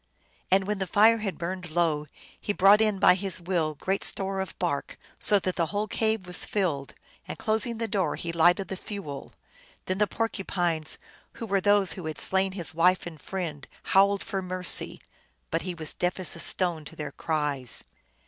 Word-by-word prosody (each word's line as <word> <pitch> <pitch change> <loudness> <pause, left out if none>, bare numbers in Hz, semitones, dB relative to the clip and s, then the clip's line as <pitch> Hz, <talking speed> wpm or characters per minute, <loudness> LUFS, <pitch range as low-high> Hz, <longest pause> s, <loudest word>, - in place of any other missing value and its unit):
And 190 +1 +4
when 210 0 -2
the 190 - -2
fire 220 +5 +5
had 205 -3 -3
burned 180 +1 -4
low 155 -2 0 0.3
he 205 - -2
brought 200 +2 +6
in 215 -2 +2
by 190 - +6
his 190 0 -2
will 170 -3 -1
great 190 +6 -1
store 195 0 -2
of 190 - -5
bark, 155 -6 -2 0.2
so 205 - +5
that 185 -2 -2
the 170 -2 +1
whole 210 +3 -2
cave 220 -2 0
was 180 0 -1
filled, 160 -9 -2 0.3
and - - -5
closing 220 +2 0
the 230 0 -2
door 190 -7 0
he 170 - -4
lighted 175 +3 +3
the 190 - -3
fuel. 180 -10 -7 0.5
Then 185 +1 -2
the 210 - +3
Porcupines, 175 -8 -1 0.4
who 230 - -6
were 200 -2 +1
those 205 -1 +3
who 180 -4 -6
had 155 - -5
slain 190 0 +2
his 170 -6 -1
wife 180 +3 +3
and 160 -4 -9
friend, 165 -7 -5 0.2
howled 200 +1 +3
for 195 -1 -3
mercy, 185 -1 +1 0.5
but - - 0
he 180 -2 -4
was 155 -3 -3
deaf 180 +1 -1
as 185 - -1
a - - -9
stone 170 -3 +1
to - - -9
their 150 -2 -5
cries. 145 -6 -1
185 Hz, 190 wpm, -27 LUFS, 165-200 Hz, 0.5 s, brought